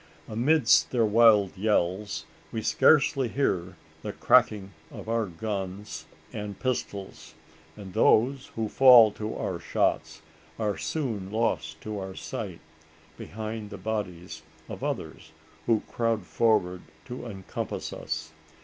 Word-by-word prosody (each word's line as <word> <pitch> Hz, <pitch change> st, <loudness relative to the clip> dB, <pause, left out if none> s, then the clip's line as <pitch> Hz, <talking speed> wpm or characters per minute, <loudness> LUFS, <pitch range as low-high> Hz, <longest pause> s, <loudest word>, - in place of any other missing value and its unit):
Amidst 135 Hz, +8 st, +3 dB
their 120 Hz, -3 st, +2 dB
wild 105 Hz, -3 st, +5 dB
yells, 95 Hz, -4 st, -1 dB, 0.3 s
we 110 Hz, -, -4 dB
scarcely 140 Hz, -3 st, +4 dB
hear 95 Hz, -8 st, -1 dB, 0.3 s
the -, -, -4 dB
cracking 100 Hz, -2 st, +3 dB, 0.2 s
of -, -, -10 dB
our 115 Hz, -1 st, 0 dB
guns 95 Hz, -3 st, -5 dB, 0.3 s
and 105 Hz, -2 st, -6 dB
pistols; 100 Hz, -6 st, -4 dB, 0.4 s
and 95 Hz, -3 st, -10 dB
those 130 Hz, +8 st, +3 dB
who 110 Hz, -1 st, -1 dB
fall 120 Hz, -2 st, +7 dB
to 110 Hz, +1 st, -5 dB
our 90 Hz, -2 st, -3 dB
shots 85 Hz, -, -1 dB, 0.3 s
are 105 Hz, -3 st, -1 dB
soon 110 Hz, -11 st, -3 dB
lost 80 Hz, -8 st, -1 dB
to 105 Hz, -1 st, -5 dB
our 95 Hz, -1 st, -6 dB
sight, -, -, -6 dB, 0.5 s
behind 110 Hz, 0 st, -6 dB
the 100 Hz, -, -8 dB
bodies 90 Hz, -6 st, -5 dB, 0.3 s
of -, -, -8 dB
others -, -, -5 dB, 0.3 s
who 115 Hz, -2 st, +3 dB
crowd 115 Hz, -4 st, -2 dB
forward 95 Hz, -6 st, +1 dB, 0.2 s
to 125 Hz, 0 st, -7 dB
encompass 95 Hz, -4 st, -5 dB
us. 80 Hz, -, -5 dB
105 Hz, 120 wpm, -27 LUFS, 95-115 Hz, 0.5 s, fall